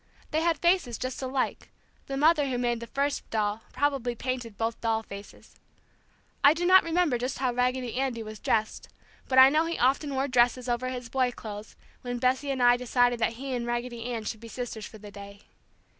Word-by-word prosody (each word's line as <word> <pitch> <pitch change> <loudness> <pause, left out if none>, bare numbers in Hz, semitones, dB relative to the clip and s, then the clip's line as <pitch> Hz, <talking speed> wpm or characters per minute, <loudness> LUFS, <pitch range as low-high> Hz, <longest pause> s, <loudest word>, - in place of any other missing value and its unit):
They 315 0 +1
had 335 -1 +2
faces 340 - +2
just 255 +3 -4
alike; 260 0 -2 0.4
the 275 - -3
mother 300 0 +4
who 250 - -1
made 240 -1 0
the 235 - -8
first 280 +4 -2
doll 215 0 -1
probably 260 -3 0
painted 245 -3 -4
both 225 0 -2
doll 225 -1 0
faces. 200 -1 -11 0.9
I 285 +2 +7
do 350 +2 -1
not 370 +1 +7
remember 330 -6 +1
just 250 +2 -3
how 255 -1 0
Raggedy 250 0 0
Andy 255 -4 -1
was 215 0 -9
dressed, 220 -1 -1 0.4
but 260 - 0
I 260 0 +10
know 315 +2 +2
he 335 - -2
often 275 +3 +1
wore 265 +1 0
dresses 250 -1 +2
over 245 +1 -1
his 250 -1 -5
boy 255 0 +1
clothes 210 -2 -9 0.3
when 245 -1 -4
Bessie 260 +4 +1
and 265 -2 0
I 245 0 +6
decided 245 -1 +2
that 230 0 +1
he 265 +3 -5
and 240 -1 -2
Raggedy 240 -1 -3
Ann 235 -3 -3
should 220 0 -5
be 230 - -10
sisters 230 -2 -6
for 220 - -12
the 205 -1 -11
day. 200 0 -11
250 Hz, 205 wpm, -28 LUFS, 230-270 Hz, 0.9 s, I